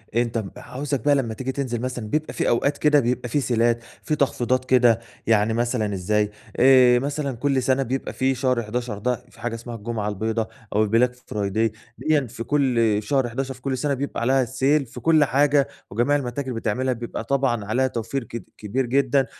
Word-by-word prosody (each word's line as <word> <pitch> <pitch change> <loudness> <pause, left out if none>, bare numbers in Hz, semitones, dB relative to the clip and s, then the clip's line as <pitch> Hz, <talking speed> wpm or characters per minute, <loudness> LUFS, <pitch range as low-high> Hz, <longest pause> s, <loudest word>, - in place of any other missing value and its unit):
أنت 120 -1 +1
م 105 -4 -3
عاوزك 140 +1 -4
بقى 145 -1 +5
لمّا 120 -5 -1
تيجي 130 +4 -3
تنزل 130 -4 -3
مثلًا 125 -3 -4
بيبقى 155 +6 -2
في - - 0
أوقات 140 +5 +1
كده 150 -1 +4
بيبقى 125 0 -1
في 145 +5 +1
سيلات 120 -2 +1 0.2
في 155 - 0
تخفيضات 130 -3 0
كده، 120 -3 +4 0.3
يعني 110 0 +3
مثلًا 115 -3 0
إزاي 105 +3 0 0.3
آآ، 125 -1 +6
مثلًا 140 -1 -2
كُلّ 135 0 +1
سنة 130 +1 +2
بيبقى 130 +2 -3
في 130 0 +1
شهر 125 -2 +1
11 115 0 -3
ده 125 +4 0 0.2
في - - -19
حاجة 115 0 -2
اسمها 115 +1 -7
الجمعة 110 -1 -3
البيضا 110 +2 -2 0.3
أو 110 - +4
البلاك 115 +4 +2
فرايدي 105 +2 -1 0.2
ديًّا 145 0 +1
في 115 - -7
كُلّ 140 -2 +1 0.3
في 105 - -14
شهر 135 -4 +1
11 135 +3 -3
في 125 - -17
كُلّ 135 -1 -2
سنة 140 +3 0
بيبقى 140 -2 -3
عليها 130 +1 +3
sale 135 +4 +2
في 115 - -10
كُلّ 160 -2 +4
حاجة 140 0 +3 0.2
وجميع 120 +8 +2
المتاجر 130 -1 -3
بتعملها، 120 +3 -1
بيبقى 120 0 -5
طبعًا 130 -6 0
عليها 125 +5 +1
توفير 120 +2 -3
كد 115 +1 -7
كبير 120 +5 -2
جدًا، 135 +2 +2
125 Hz, 195 wpm, -23 LUFS, 115-135 Hz, 0.3 s, آآ